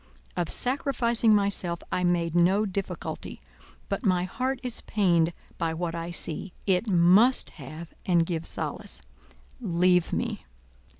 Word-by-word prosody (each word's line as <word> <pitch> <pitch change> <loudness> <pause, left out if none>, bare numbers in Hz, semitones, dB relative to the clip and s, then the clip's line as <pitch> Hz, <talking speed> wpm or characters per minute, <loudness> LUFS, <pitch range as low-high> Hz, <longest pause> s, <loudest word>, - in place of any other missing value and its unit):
Of 170 - -1
sacrificing 240 -4 +3
myself 195 -4 0
I 180 - 0
made 170 -2 +1
no 185 +5 +3
difficulty 195 -1 -5 0.5
but - - -3
my 180 -4 +2
heart 255 +8 -2
is 250 -2 -2
pained 175 -5 +2 0.3
by 165 -1 -1
what 170 0 -3
I 170 0 -4
see; 170 +1 -6
it 195 +3 +1
must 190 +8 +4
have 155 +5 -9
and 170 -2 +2
give 165 -2 0
solace. - - -3 0.6
_Leave 180 -3 +2
me! - - -3
180 Hz, 130 wpm, -27 LUFS, 170-210 Hz, 0.6 s, must